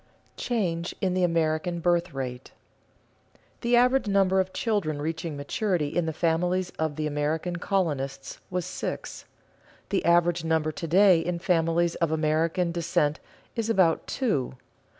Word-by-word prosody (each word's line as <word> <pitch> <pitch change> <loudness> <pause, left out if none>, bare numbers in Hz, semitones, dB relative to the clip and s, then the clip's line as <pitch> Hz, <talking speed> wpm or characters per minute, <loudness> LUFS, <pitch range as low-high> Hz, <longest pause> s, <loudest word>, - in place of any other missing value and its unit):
[Sidenote: - - -37
Change 175 -8 -2
in 185 -2 0
the 185 0 +1
American 165 0 0
birth 175 +1 +1
rate] 130 -2 -6 1.1
The 240 0 +2
average 250 0 +3
number 195 -1 +3
of 190 0 0
children 195 -11 -1
reaching 160 0 -3
maturity 155 +2 -1
in 170 +2 -1
the - - 0
families 175 +3 0
of 160 -2 -1
the 155 0 -2
American 150 +4 -1
colonists 145 -8 -2
was 180 -2 -2
six; 180 - -5 0.6
the 195 - 0
average 170 0 +3
number 160 -1 +1
to 165 +2 -6
day 185 +1 +6
in 175 +1 -2
families 170 -1 +1
of 170 -2 0
American 160 +3 +1
descent 170 -3 0 0.4
is 230 -1 -2
about 185 -7 +2
two. 175 - -1
170 Hz, 145 wpm, -26 LUFS, 155-185 Hz, 1.1 s, day